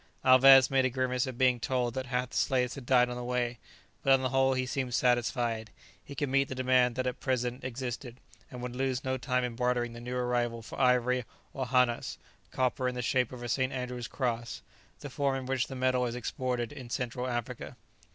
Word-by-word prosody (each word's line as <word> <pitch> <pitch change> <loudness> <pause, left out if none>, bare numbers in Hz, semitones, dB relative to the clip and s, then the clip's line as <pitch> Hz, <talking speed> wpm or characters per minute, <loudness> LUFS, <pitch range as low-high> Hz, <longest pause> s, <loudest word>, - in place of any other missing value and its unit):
Alvez 130 +1 +8
made 135 -1 +3
a 130 - +2
grimace 125 0 -1
on 130 - -5
being 125 -1 +3
told 125 0 -1
that 130 0 -4
half 125 0 -2
the - - -9
slaves 125 -2 +1
had 130 -3 -9
died 125 -2 +5
on 125 - -5
the 125 - -5
way, 120 -1 -1 0.4
but 135 - +2
on 135 -1 +5
the 130 - +1
whole 135 +1 +2
he 130 0 0
seemed 125 -1 -2
satisfied; 120 -2 +1 0.3
he 140 - -10
could 145 +1 -1
meet 135 +1 +2
the 130 - -5
demand 130 -1 +3
that 130 0 -1
at 125 -1 -2
present 125 -1 -2
existed, 125 -1 -5 0.3
and 125 -1 -8
would 125 0 -5
lose 130 0 -1
no 130 0 -1
time 125 0 -1
in 120 -2 -3
bartering 120 -1 0
the 120 - -9
new 125 +1 -5
arrival 120 -2 -1
for - - -6
ivory 125 0 +3 0.3
or 130 -1 -3
hannas, 125 -1 +1 0.3
copper 130 0 0
in 125 - -2
the 125 - -3
shape 125 0 +1
of 125 -1 -8
a - - -4
St. 130 +3 0
Andrew's 125 -2 -4
cross, 120 -3 -3 0.4
the 145 - -6
form 140 0 0
in 130 -1 -4
which 130 -1 0
the 135 - -7
metal 130 -1 +1
is 120 - -4
exported 125 -1 -3
in 125 -3 -9
Central 125 +1 -3
Africa. 120 -2 -4
125 Hz, 220 wpm, -30 LUFS, 120-130 Hz, 0.4 s, Alvez